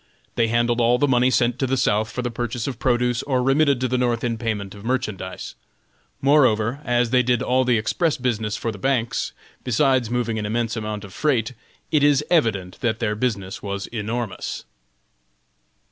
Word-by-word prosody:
They 115 -1 +2
handled 120 +1 +1
all 120 +1 +4
the 145 - +2
money 125 -1 +3
sent 120 -1 +1
to 135 - +1
the 135 +1 0
South 110 -2 +1
for 125 +3 -4
the 120 - -2
purchase 120 0 -3
of 125 -4 -4
produce, 125 -1 +1
or 130 -3 0
remitted 140 0 +3
to 130 - +1
the 125 0 0
North 120 -2 0
in 115 -2 -1
payment 105 -4 -3
of 100 -1 -12
merchandise. 110 -7 -3 0.7
Moreover, 130 -3 +3
as 120 -1 +1
they 125 -1 +5
did 125 -1 +1
all 130 +1 +2
the 125 -2 +2
express 155 +9 0
business 110 -4 -1
for 115 - -2
the 105 - -10
banks, 125 -1 0 0.3
besides 130 -1 +2
moving 120 -2 -1
an 105 - -3
immense 115 +1 -1
amount 105 -2 -4
of 100 -2 -11
freight, 130 -5 0 0.4
it 150 -2 +3
is 145 0 +4
evident 105 - +1
that 115 -4 0
their 115 -3 -1
business 105 -4 -2
was 100 -1 -4
enormous. 115 0 -4
120 Hz, 185 wpm, -22 LUFS, 110-130 Hz, 0.7 s, they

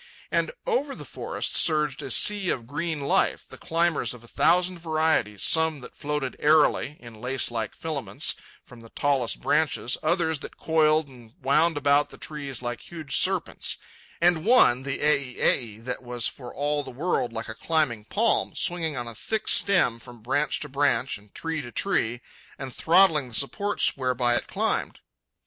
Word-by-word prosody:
And - - +1
over 295 - -1
the - - -9
forest - - -3
surged 150 -4 +2
a - - -6
sea 200 - +3
of 120 - -2
green 155 +3 -3
life, 140 - +1
the - - -12
climbers 165 -5 0
of 120 - -14
a - - -13
thousand 180 +6 +2
varieties, 155 - 0
some 160 -2 +2
that 125 - -11
floated 150 -3 -3
airily, 150 -1 +3
in 115 -3 -13
lacelike 120 -4 -1
filaments, 155 -4 -2 0.3
from 125 - -14
the 115 0 -14
tallest 135 -4 0
branches 150 -5 +1
others 160 -4 +1
that - - -9
coiled 155 -1 +2
and 120 -4 -16
wound 150 +4 +3
about 145 0 +3
the - - -13
trees 140 -5 -6
like 120 -1 -4
huge 155 -6 -5
serpents; - - +1 0.4
and 170 -2 +3
one, 210 - +5
the 135 0 -4
ei 140 -4 +1
ei, 110 -4 +1
that 125 +3 -5
was 120 -2 -2
for 125 -3 -8
all 145 0 -1
the - - -8
world 135 -2 -1
like 115 0 -5
a 110 - -4
climbing 130 -6 0
palm, 225 - +1
swinging 165 -5 -1
on 120 -1 -3
a 115 - -5
thick 220 - -3
stem 180 -12 +3
from 120 -2 -13
branch 140 +5 0
to 150 - -3
branch 140 -4 0
and 105 0 -23
tree 165 -1 -3
to 120 -3 -9
tree 120 - -1 0.4
and 135 -2 -7
throttling 165 -5 +4
the 115 - -4
supports 200 - 0
whereby 125 -2 +1
it - - 0
climbed. - - -2
145 Hz, 170 wpm, -25 LUFS, 125-160 Hz, 0.4 s, one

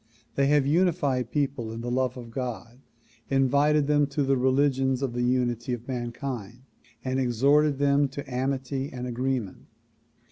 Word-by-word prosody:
They 140 0 +2
have 145 -1 +3
united 145 -6 +1
people 135 -6 -2
in 115 +1 -6
the 120 +1 -4
love 130 0 0
of 120 -2 -9
God, 120 -1 -5 0.5
invited 140 +2 +3
them 145 0 +3
to 140 +1 -1
the 135 0 +2
religions 130 0 +2
of 130 -3 -2
the 120 - -2
unity 120 -1 0
of 120 0 -6
mankind 120 -2 -5 0.4
and 130 0 0
exhorted 140 +4 +3
them 140 0 +3
to 140 +1 -8
amity 135 +1 -2
and 125 -1 -5
agreement. 125 -4 -3
130 Hz, 150 wpm, -26 LUFS, 125-140 Hz, 0.5 s, have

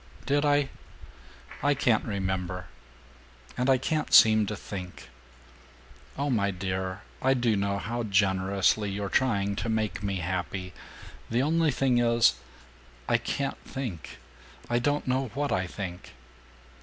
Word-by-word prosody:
"Did 145 +1 +2
I? 145 -1 +3 0.9
I 145 +1 +3
can't 120 -4 +2
remember. 95 -3 -3 0.9
And 125 +2 0
I 135 - +6
can't 155 +4 -2
seem 110 -1 +7
to 105 - -3
think. 90 -3 -8 1.1
Oh, 140 0 0
my 100 -4 +2
dear, 95 +1 -3 0.2
I 135 +1 +3
do 120 -3 +2
know 100 0 0
how 120 +4 -3
generously 100 0 +2
you're 100 0 -3
trying 100 -5 +1
to 115 - -2
make 110 -2 -1
me 100 -1 -2
happy. 90 +1 -3 0.6
The 120 +3 +1
only 160 +2 +2
thing 130 -3 +2
is 115 -1 +4 0.7
I - - +3
can't 140 -1 -3
think. 110 - -6 0.5
I 120 - +3
don't 145 +4 0
know 130 +1 +1
what 145 0 -1
I 95 0 0
think." 90 -1 -7
105 Hz, 135 wpm, -28 LUFS, 95-130 Hz, 1.1 s, seem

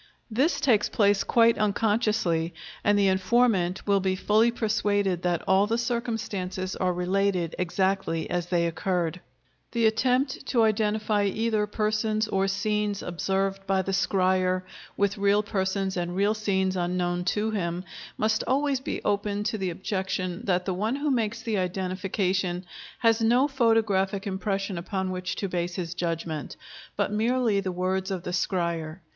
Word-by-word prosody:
This 270 +10 +2
takes 225 -7 +3
place 205 -2 +3
quite 230 -1 +4
unconsciously, 210 -6 +1 0.3
and 205 0 +3
the 200 -1 +4
informant 190 -1 +2
will 200 -1 +3
be 190 0 0
fully 215 +4 +3
persuaded 205 -5 0
that 175 -2 0
all 190 +2 +4
the 230 +2 0
circumstances 215 -6 -3
are 185 -1 0
related 180 -1 0
exactly 185 -2 0
as 175 -1 -2
they 175 -1 +1
occurred. 170 0 -1 0.5
The 230 -1 +2
attempt 255 +5 +1
to 235 -3 +3
identify 215 -1 +1
either 215 +1 0
persons 215 +1 0
or 195 -1 +1
scenes 210 +1 -1
observed 195 +2 -2
by 190 -1 +2
the 195 - -3
scryer 185 -1 +1 0.3
with 200 0 +1
real 200 +1 +3
persons 190 -2 -1
and 175 0 -2
real 200 +2 +2
scenes 190 -3 0
unknown 175 0 -1
to 210 +4 0
him, 180 -4 -2 0.3
must 215 0 +1
always 275 +1 +1
be 265 - -4
open 205 0 0
to 220 +1 -1
the 190 -1 -1
objection 185 -1 -3
that 180 -2 +1
the 190 - -1
one 215 +7 -1
who 290 +1 -1
makes 230 -2 -1
the 220 -4 0
identification 185 0 -1 0.4
has 225 -1 +3
no 240 +5 +4
photographic 220 -7 +1
impression 195 -1 -2
upon 190 +1 -3
which 185 0 -3
to 200 - -2
base 175 -1 -2
his 175 -2 -4
judgment, 165 -3 -3 0.4
but - - 0
merely 225 0 +1
the 190 -1 -2
words 185 +2 -1
of 185 -3 -3
the 180 - -4
scryer. 170 -3 -1
195 Hz, 150 wpm, -26 LUFS, 185-215 Hz, 0.5 s, quite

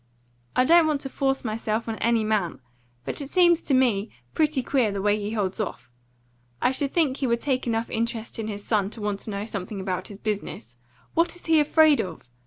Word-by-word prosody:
I 255 - +4
don't 335 +2 +6
want 295 -3 0
to 270 - -4
force 270 -1 -1
myself 220 0 -2
on 225 -1 -3
any 230 -1 +2
man; 210 -6 0 0.5
but - - -4
it 280 - -6
seems 345 -1 +4
to 275 - +1
me 230 -5 +2 0.2
pretty 305 -4 +1
queer 245 -5 +1
the 200 - -3
way 205 +1 +2
he 210 +1 -4
holds 200 -2 -1
off. 205 - -5 0.7
I 250 - +2
should 275 +1 0
think 300 -6 +1
he 270 - -1
would 235 -1 +1
take 260 -3 -1
enough 230 0 0
interest 230 0 -3
in 220 - -3
his 205 -1 -6
son 205 -3 +1
to - - -7
want 205 -1 -2
to - - -7
know 200 0 -3
something 200 -1 -5
about 185 -1 -3
his 200 - -10
business. 200 - -4 0.4
What 335 +1 +2
is 355 - -14
he 320 -1 +4
afraid 305 0 +5
of?" 165 -8 -8
230 Hz, 215 wpm, -25 LUFS, 205-275 Hz, 0.7 s, don't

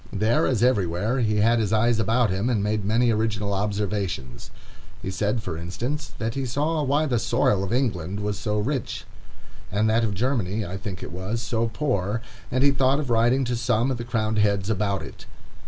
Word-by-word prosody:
There, 110 +4 +2
as 120 -3 +1
everywhere, 105 0 +1
he 110 -3 +1
had 115 +3 +4
his 105 -2 0
eyes 110 +1 +3
about 110 0 +2
him, 100 +6 0
and 110 -5 +1
made 105 0 0
many 115 +4 +3
original 105 -2 0
observations. 100 - -2 0.5
He 95 - -4
said, 105 +4 -1
for 80 - -4
instance, 120 - -4
that 110 +1 -2
he 135 - -2
saw 150 +6 0
why 145 +2 +2
the 125 -6 +1
soil 100 -2 +2
of 100 - -3
England 100 -7 -1
was 105 -2 -2
so 105 -1 -1
rich, 130 +5 -2 0.7
and 105 +3 +2
that 115 +1 +3
of 105 -3 -1
Germany 110 -3 0
(I 90 - -5
think 95 -1 -6
it - - -7
was) 95 +6 -3
so 115 0 -1
poor, 115 -8 -1 0.3
and 130 +1 +1
he 140 - +6
thought 135 +1 +2
of 140 -5 -3
writing 120 +4 +3
to 120 0 -1
some 120 +1 +1
of 130 - -1
the 120 - -4
crowned 110 -2 0
heads 100 0 +2
about 100 -2 0
it. - - -11
110 Hz, 200 wpm, -25 LUFS, 100-125 Hz, 0.7 s, he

